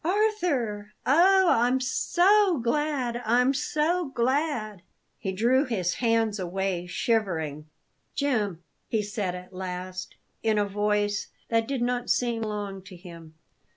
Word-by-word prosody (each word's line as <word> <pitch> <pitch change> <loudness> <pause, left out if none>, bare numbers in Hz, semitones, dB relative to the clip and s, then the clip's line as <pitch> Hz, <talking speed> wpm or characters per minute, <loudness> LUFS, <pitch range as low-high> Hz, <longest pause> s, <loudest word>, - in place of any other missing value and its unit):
"Arthur! 320 - 0
Oh, 375 +7 +5
I'm 245 +3 +3
so 355 +9 +3
glad 250 -1 -1
I'm 250 +4 +3
so 320 +5 0
glad!" 245 - -1 0.4
He 190 - -3
drew 240 +8 +3
his 190 - -1
hands 225 -3 +2
away, 185 -1 -2
shivering. 165 -8 -1 0.5
"Jim!" 210 - -1 0.3
he 220 -2 0
said 200 -3 -3
at 180 +1 -10
last, 185 0 -6 0.3
in 220 -1 +1
a 205 - +2
voice 205 +1 0 0.2
that 225 -1 +1
did 270 -3 -1
not 245 0 -1
seem 235 -2 +1
to 220 - -2
belong 205 -2 -4
to 185 - -11
him. 170 -3 -12
225 Hz, 130 wpm, -27 LUFS, 195-265 Hz, 0.5 s, Oh